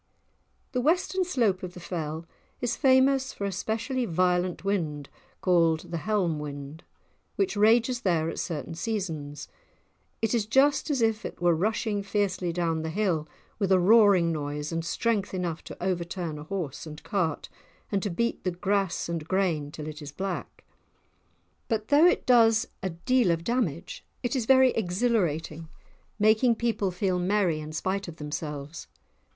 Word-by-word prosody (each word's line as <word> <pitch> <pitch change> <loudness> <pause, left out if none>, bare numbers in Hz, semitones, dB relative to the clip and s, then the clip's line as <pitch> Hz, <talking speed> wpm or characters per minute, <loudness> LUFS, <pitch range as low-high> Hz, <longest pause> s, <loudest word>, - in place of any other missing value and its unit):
The 250 -2 0
western 360 +6 +2
slope 230 - +1
of 180 -1 -7
the - - -8
Fell 160 -2 -4 0.3
is 245 - -1
famous 265 -1 +3
for 200 - -4
a 200 - -1
specially 230 +7 -2
violent 180 0 0
wind 155 -8 -1 0.3
called 165 -3 +2
the 170 - -1
"Helm 175 -3 0
wind," 145 +1 -7 0.5
which 390 - 0
rages 230 +4 +3
there 165 -4 +1
at - - -4
certain 165 0 -4
seasons. 165 -7 -4 0.7
It 225 0 0
is 220 -3 +1
just 280 +7 +3
as 270 -5 +1
if 220 -1 +1
it - - -7
were 175 0 +3
rushing 210 +4 0
fiercely 195 -3 -1
down 165 -2 -1
the 160 - -3
hill, 165 -4 0 0.3
with 195 -3 0
a 190 - +7
roaring 195 -3 +5
noise 150 -1 -3
and 165 0 -2
strength 205 +2 -1
enough 175 -3 -3
to - - -9
overturn 170 -3 -3
a 150 - -9
horse 165 -5 -4
and 150 0 -9
cart, 180 -8 -1 0.4
and 200 -2 +1
to 205 - -2
beat 235 +6 -1
the 185 - +1
grass 195 +1 -1
and 165 -2 -4
grain 170 -6 0
till 150 0 -7
it 155 0 -7
is 145 -1 -7
black! 190 +4 -5 1.0
But 220 -2 -2
though 295 +4 +7
it - - +2
does 225 -3 +5
a 190 - -1
deal 225 +6 +1
of 165 -1 0
damage 190 - -2 0.2
it 245 +2 -1
is 240 -4 -1
very 260 -1 +6
exhilarating, 175 -6 -1 0.5
making 220 +3 +4
people 220 -4 0
feel 180 0 -1
merry 180 -3 +1
in 155 0 -7
spite 190 +5 -2
of 170 - -8
themselves. 150 -1 -6
185 Hz, 160 wpm, -27 LUFS, 165-225 Hz, 1.0 s, a